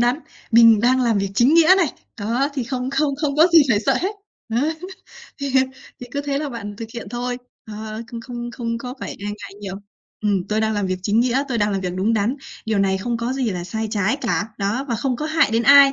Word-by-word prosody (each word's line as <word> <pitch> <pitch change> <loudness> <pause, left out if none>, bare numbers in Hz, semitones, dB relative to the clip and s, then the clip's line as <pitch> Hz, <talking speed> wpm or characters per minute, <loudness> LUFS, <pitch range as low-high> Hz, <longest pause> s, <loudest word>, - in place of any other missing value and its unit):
đắn, 245 +3 +2 0.3
mình 230 -2 +7
đang 255 +3 +3
làm 230 -4 +2
việc 195 0 -1
chính 245 +9 +4
nghĩa 335 +2 +7
này. 375 -3 +3 0.3
Đó, 235 +7 0
thì 260 -4 -2
không 250 +1 -3
không 280 0 +1
không 290 -2 0
có 315 +3 +7
gì 330 -2 +9
phải 205 -3 +3
sợ - - +2
hết. 390 +4 -2 0.3
Đấy. 265 +8 0 0.7
Thì 280 -1 -2 0.5
thì 245 - -7
cứ 285 - -2
thế 280 -1 -1
là 300 0 -3
bạn 205 -5 -7
thực 225 +1 -7
hiện 235 - -6
thôi, 245 +1 -3 0.3
ờ, 215 +1 -6
không 230 0 -7
không 240 0 -6
không 230 -1 -3
có 250 +1 -6
phải - - -5
e 200 - -8
ngại 205 -1 -7
nhiều. 195 -2 -5 0.5
Ừm, 200 -4 +1
tôi 215 +1 +1
đang 220 0 +1
làm 205 -2 -1
việc 185 0 -2
chính 210 +3 +2
nghĩa, 255 +2 +2
tôi 240 -3 -1
đang 205 0 +1
làm 195 - -1
việc 180 -1 -3
đúng 200 +5 +1
đắn, 220 +5 0 0.3
điều 220 -2 +1
này 190 -1 +2
không 235 +5 -2
có 235 +2 -2
gì 260 -4 -1
là 180 -2 -4
sai 220 +4 -3
trái 210 +2 +1
cả, 225 -4 -1
đó, 205 +7 -1
và 235 - 0
không 250 +2 -1
có 300 - -3
hại 315 -3 +3
đến 225 +1 +2
ai. 275 +2 +8
235 Hz, 250 wpm, -21 LUFS, 210-265 Hz, 0.7 s, gì